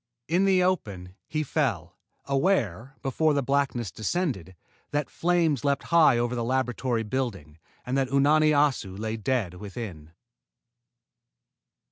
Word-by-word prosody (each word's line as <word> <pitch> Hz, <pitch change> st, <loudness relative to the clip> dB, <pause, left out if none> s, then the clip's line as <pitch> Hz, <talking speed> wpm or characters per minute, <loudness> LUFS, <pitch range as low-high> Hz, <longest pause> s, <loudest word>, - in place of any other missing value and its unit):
In 175 Hz, +5 st, +2 dB
the 190 Hz, -2 st, +4 dB
open, 100 Hz, -, -2 dB
he 155 Hz, 0 st, -1 dB
fell, 145 Hz, -, -1 dB, 0.3 s
aware, 135 Hz, -, 0 dB
before 145 Hz, +2 st, +1 dB
blackness 135 Hz, -6 st, 0 dB
descended, 110 Hz, -, -2 dB, 0.3 s
that 145 Hz, -1 st, -2 dB
flames 165 Hz, -7 st, +1 dB
leaped 140 Hz, -1 st, +1 dB
high 160 Hz, -7 st, +5 dB
over 120 Hz, +1 st, 0 dB
the 120 Hz, -1 st, -2 dB
laboratory 125 Hz, -1 st, -1 dB
building 105 Hz, -, -4 dB, 0.3 s
and 125 Hz, -, -2 dB
that 135 Hz, -, +1 dB
Unani 150 Hz, +3 st, +4 dB
Assu 145 Hz, -10 st, +1 dB
lay 110 Hz, +1 st, -3 dB
dead 115 Hz, -4 st, -1 dB
within. 90 Hz, -5 st, -8 dB
130 Hz, 120 wpm, -26 LUFS, 110-150 Hz, 0.3 s, high